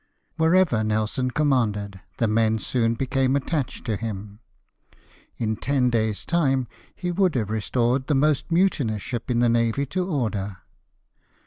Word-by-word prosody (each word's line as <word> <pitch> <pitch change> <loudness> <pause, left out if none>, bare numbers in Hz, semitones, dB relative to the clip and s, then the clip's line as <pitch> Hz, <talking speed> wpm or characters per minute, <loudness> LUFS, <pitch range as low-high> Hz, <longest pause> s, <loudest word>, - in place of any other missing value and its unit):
Wherever 165 -8 +3
Nelson 110 +4 0
commanded, 110 -9 0 0.2
the 115 - +1
men 110 0 +2
soon 115 +1 0
became 135 +1 +1
attached 140 -2 -2
to 110 -3 -1
him 105 -1 -6 0.5
— - - -31
in 110 -1 -1
ten 125 +1 +1
days' 110 -3 -1
time 135 -7 +1 0.3
he 180 -1 -3
would 185 -2 +2
have 110 -4 -1
restored 120 +4 0
the 150 - +2
most 150 +3 +1
mutinous 145 - +1
ship 120 +1 -5
in 120 -1 +2
the 120 - +4
navy 115 +3 +1
to 180 +7 -2
order. 105 - -2
120 Hz, 145 wpm, -24 LUFS, 110-140 Hz, 0.5 s, the